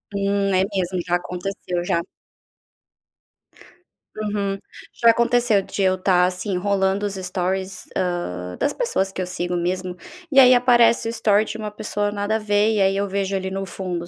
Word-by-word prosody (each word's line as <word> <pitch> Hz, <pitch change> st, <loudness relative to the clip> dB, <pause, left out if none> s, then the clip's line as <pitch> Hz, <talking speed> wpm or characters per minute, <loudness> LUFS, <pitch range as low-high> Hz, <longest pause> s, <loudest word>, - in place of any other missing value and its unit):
Hum, 200 Hz, 0 st, 0 dB
é 185 Hz, -, +4 dB
mesmo, 185 Hz, -1 st, -1 dB
já 175 Hz, -, +1 dB
aconteceu 180 Hz, 0 st, -4 dB
já. 170 Hz, -, +1 dB, 2.2 s
Uhum. 205 Hz, -2 st, -2 dB, 0.5 s
Já 230 Hz, -, +9 dB
aconteceu 235 Hz, -2 st, +2 dB
de 195 Hz, +1 st, -3 dB
eu 185 Hz, 0 st, +3 dB
estar, 185 Hz, -1 st, +3 dB
assim, 185 Hz, +1 st, -2 dB
rolando 195 Hz, +1 st, 0 dB
os 200 Hz, -, -2 dB
stories, 190 Hz, 0 st, -3 dB
hã, 90 Hz, -, -3 dB
das -, -, +1 dB
pessoas 195 Hz, -, -1 dB
que 190 Hz, -, -5 dB
eu 180 Hz, -, -3 dB
sigo 180 Hz, 0 st, -3 dB
mesmo, 180 Hz, +1 st, -2 dB, 0.4 s
e 275 Hz, -, +6 dB
aí 255 Hz, -1 st, +8 dB
aparece 240 Hz, -2 st, +4 dB
o -, -, -1 dB
story 215 Hz, -2 st, +2 dB
de 220 Hz, -, -6 dB
uma 215 Hz, -1 st, -4 dB
pessoa 205 Hz, 0 st, -2 dB
nada 205 Hz, +1 st, -1 dB
a -, -, 0 dB
ver, 210 Hz, +1 st, +2 dB
e 210 Hz, -, +1 dB
aí 195 Hz, 0 st, +2 dB
eu 200 Hz, 0 st, 0 dB
vejo 195 Hz, 0 st, -2 dB
ele 190 Hz, 0 st, -3 dB
no 195 Hz, 0 st, -3 dB
fundo, 175 Hz, -2 st, -5 dB
195 Hz, 175 wpm, -22 LUFS, 185-210 Hz, 2.2 s, Já